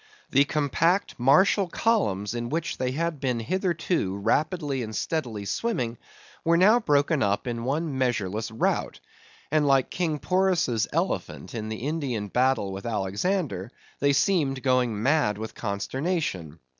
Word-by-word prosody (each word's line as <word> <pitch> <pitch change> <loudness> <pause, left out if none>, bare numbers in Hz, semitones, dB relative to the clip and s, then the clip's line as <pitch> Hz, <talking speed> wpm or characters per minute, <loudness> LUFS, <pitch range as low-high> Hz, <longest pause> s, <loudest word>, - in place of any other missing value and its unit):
The 140 +1 +5
compact 155 +5 +1
martial 185 - +4
columns 115 - 0
in 120 0 -3
which 165 +3 -2
they 130 - 0
had 165 0 -2
been 125 -3 -1
hitherto 170 - -1
rapidly 145 - 0
and 110 -2 -5
steadily 120 -11 -2
swimming, 120 - -2 0.4
were 170 +1 +3
now 210 +7 +6
broken 145 - +2
up 100 0 +1
in 120 -1 -3
one 150 +2 -1
measureless 110 -4 -1
rout; 110 - -1 0.5
and 150 -1 +3
like 135 -2 +3
King 165 -4 -1
Porus' 170 - +1
elephants - - -2
in 110 -2 -4
the 110 +3 -5
Indian 130 -10 -2
battle 125 -4 +1
with 95 +3 -6
Alexander, 110 - -1 0.3
they 140 0 +3
seemed 140 -6 +1
going 125 -5 +1
mad 135 -7 +2
with 110 +1 -6
consternation. 100 - -3
135 Hz, 140 wpm, -26 LUFS, 110-165 Hz, 0.5 s, now